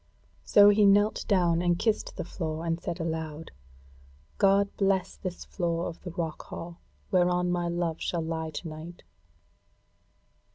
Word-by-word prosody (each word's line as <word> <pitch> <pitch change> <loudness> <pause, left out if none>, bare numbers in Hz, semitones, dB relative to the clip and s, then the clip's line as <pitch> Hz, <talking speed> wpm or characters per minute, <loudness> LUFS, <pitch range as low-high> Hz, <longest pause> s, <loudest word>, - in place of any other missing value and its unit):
So 205 0 +7
he 205 +1 +4
knelt 205 +2 +3
down 175 -5 +3
and 175 -1 +2
kissed 220 +3 -1
the - - -2
floor, 160 -1 -4
and 165 0 -1
said 170 - -4
aloud: 160 -1 -4 0.9
"God 200 0 +3
bless 195 -1 +1
this 185 -2 -6
floor 170 -2 -2
of 165 - -8
the 180 - -7
rock 165 -2 -4
hall 170 +1 -8 0.3
whereon 180 -1 +2
my 175 -1 0
love 170 -1 -2
shall 170 -2 -1
lie 160 0 -3
to 155 +3 -6
night!" 160 +3 -9
175 Hz, 150 wpm, -28 LUFS, 165-190 Hz, 0.9 s, So